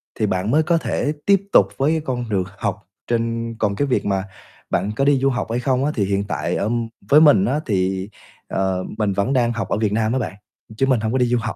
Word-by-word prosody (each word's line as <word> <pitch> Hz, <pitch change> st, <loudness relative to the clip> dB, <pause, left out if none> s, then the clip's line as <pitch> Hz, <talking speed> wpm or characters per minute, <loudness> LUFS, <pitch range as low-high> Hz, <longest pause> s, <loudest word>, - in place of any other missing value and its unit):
thì 110 Hz, -, 0 dB
bạn 95 Hz, +1 st, -1 dB
mới 155 Hz, +2 st, +4 dB
có 170 Hz, 0 st, +2 dB
thể 150 Hz, -2 st, -1 dB
tiếp 200 Hz, -1 st, +4 dB
tục -, -, +6 dB
với 140 Hz, +3 st, +2 dB
cái 160 Hz, -1 st, 0 dB
con 125 Hz, -3 st, -3 dB
đường 95 Hz, -3 st, +1 dB
học 100 Hz, -3 st, -3 dB, 0.2 s
trên 115 Hz, 0 st, -1 dB
còn 100 Hz, -2 st, 0 dB
cái 145 Hz, +6 st, 0 dB
việc 130 Hz, -, 0 dB
mà 95 Hz, -2 st, 0 dB, 0.5 s
bạn 100 Hz, +4 st, 0 dB
có 135 Hz, -, +1 dB
đi 140 Hz, -2 st, +4 dB
du 135 Hz, +1 st, +2 dB
học 125 Hz, -, -2 dB
hay 120 Hz, -, 0 dB
không 130 Hz, +1 st, +1 dB
á 150 Hz, -, +1 dB
thì 100 Hz, -, +1 dB
hiện 100 Hz, 0 st, 0 dB
tại -, -, -2 dB
ở 105 Hz, -, -1 dB, 0.4 s
với 150 Hz, +2 st, +7 dB
mình 160 Hz, +6 st, +6 dB
á 150 Hz, -, 0 dB
thì, 95 Hz, -1 st, -1 dB, 0.4 s
ờ, 95 Hz, -1 st, -1 dB
mình 105 Hz, -3 st, 0 dB
vẫn 100 Hz, +8 st, 0 dB
đang 120 Hz, -2 st, +2 dB
học 115 Hz, -, -4 dB
ở -, -, 0 dB
Việt 110 Hz, -2 st, 0 dB
Nam 110 Hz, +1 st, +1 dB
á 130 Hz, -, +1 dB
bạn, 110 Hz, -, -3 dB, 0.4 s
chứ 135 Hz, -, +2 dB
mình 130 Hz, -4 st, +2 dB
hông 110 Hz, 0 st, -2 dB
có 130 Hz, -, +1 dB
đi 125 Hz, -, +3 dB
du 120 Hz, 0 st, +1 dB
học. 110 Hz, -, -4 dB
115 Hz, 260 wpm, -21 LUFS, 100-135 Hz, 0.5 s, với